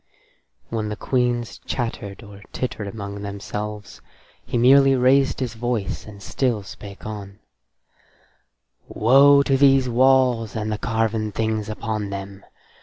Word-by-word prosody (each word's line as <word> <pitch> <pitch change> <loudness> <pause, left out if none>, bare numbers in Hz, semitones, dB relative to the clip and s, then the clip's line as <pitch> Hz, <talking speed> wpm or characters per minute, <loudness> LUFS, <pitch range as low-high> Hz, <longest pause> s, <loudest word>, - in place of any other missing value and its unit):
When 110 -2 -3
the 105 - -3
queens 120 -1 -1
chattered 115 -4 -5
or 100 -1 -13
tittered 110 -5 -4
among 100 -1 -7
themselves, 105 0 -6 0.4
he 120 +1 -3
merely 135 +3 +6
raised 135 +2 +3
his 125 -4 -3
voice 115 -7 -3
and 100 -2 -11
still 120 -6 -1
spake 100 0 -11
on: 100 -2 -7 1.5
"Woe 140 +5 +5
to 135 - +1
these 135 -1 +4
walls 125 -3 +3
and 110 -1 -2
the 105 - -3
carven 110 -2 -1
things 110 0 -2
upon 110 -1 -3
them. 100 0 -7
110 Hz, 125 wpm, -22 LUFS, 105-125 Hz, 1.5 s, merely